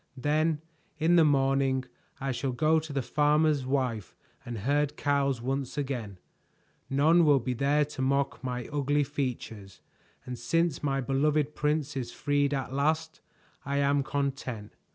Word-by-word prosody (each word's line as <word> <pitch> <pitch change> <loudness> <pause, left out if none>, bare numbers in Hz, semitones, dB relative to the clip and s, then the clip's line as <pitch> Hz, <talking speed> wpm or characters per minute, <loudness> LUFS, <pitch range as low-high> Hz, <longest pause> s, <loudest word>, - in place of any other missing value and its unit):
"Then 150 +3 +1 0.4
in 160 +3 +3
the 170 - +6
morning 135 -2 +2 0.3
I 135 0 -2
shall 130 +1 -2
go 160 +4 +3
to 155 -1 -8
the 140 -2 -1
farmer's 150 -1 +2
wife 125 - -1 0.3
and 120 -1 -6
herd 145 +6 0
cows 140 -4 0
once 135 +1 -3
again. 125 -9 -3 0.7
None 155 +6 +4
will 145 -3 +5
be 125 +1 -2
there 145 +4 +2
to 145 -2 -7
mock 140 +1 0
my 125 -2 -3
ugly 145 0 +1
features, 120 -9 -5 0.5
and 125 -1 -6
since 165 +5 0
my 135 -2 0
beloved 145 +3 +1
prince 150 -1 -1
is 125 -3 -4
freed 145 +1 0
at 135 -2 -3
last, 160 +3 0 0.4
I 140 0 -2
am 140 0 +2
content." 135 -6 -3
140 Hz, 150 wpm, -28 LUFS, 130-150 Hz, 0.7 s, the